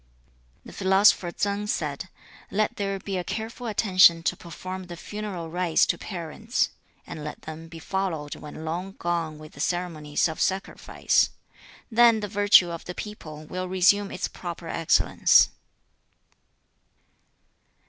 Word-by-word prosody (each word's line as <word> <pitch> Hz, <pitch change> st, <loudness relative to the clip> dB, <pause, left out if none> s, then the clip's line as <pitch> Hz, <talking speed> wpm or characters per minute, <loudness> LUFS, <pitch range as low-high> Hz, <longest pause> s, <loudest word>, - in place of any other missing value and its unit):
The -, -, -11 dB
philosopher 190 Hz, -1 st, +4 dB
Tsang 205 Hz, +3 st, -2 dB
said, 155 Hz, -1 st, -3 dB, 0.4 s
'Let 215 Hz, +2 st, 0 dB
there 195 Hz, -1 st, -1 dB
be 195 Hz, 0 st, -4 dB
a 180 Hz, -, -2 dB
careful 230 Hz, +5 st, -5 dB
attention 185 Hz, -6 st, +5 dB
to -, -, +1 dB
perform 185 Hz, +2 st, -7 dB
the 175 Hz, -1 st, -9 dB
funeral 190 Hz, -4 st, -6 dB
rites 175 Hz, -2 st, +2 dB
to -, -, -1 dB
parents, 190 Hz, -, -2 dB, 0.3 s
and 155 Hz, -, -8 dB
let 150 Hz, 0 st, -7 dB
them 160 Hz, +1 st, -8 dB
be 165 Hz, 0 st, -11 dB
followed 165 Hz, -4 st, -3 dB
when 150 Hz, +1 st, -9 dB
long 180 Hz, +4 st, -4 dB
gone 170 Hz, -4 st, -2 dB
with 155 Hz, 0 st, -12 dB
the -, -, -14 dB
ceremonies 160 Hz, -3 st, -1 dB
of 160 Hz, -, -5 dB
sacrifice; 190 Hz, +1 st, +1 dB, 0.6 s
then 230 Hz, -1 st, +6 dB
the 210 Hz, -, -3 dB
virtue 205 Hz, -3 st, +5 dB
of 170 Hz, -, -7 dB
the 180 Hz, -, -6 dB
people 155 Hz, -8 st, -8 dB
will 185 Hz, +4 st, -4 dB
resume 195 Hz, +2 st, +3 dB
its -, -, -3 dB
proper 170 Hz, -2 st, -7 dB
excellence.' 165 Hz, 0 st, +4 dB
180 Hz, 140 wpm, -26 LUFS, 165-200 Hz, 0.6 s, then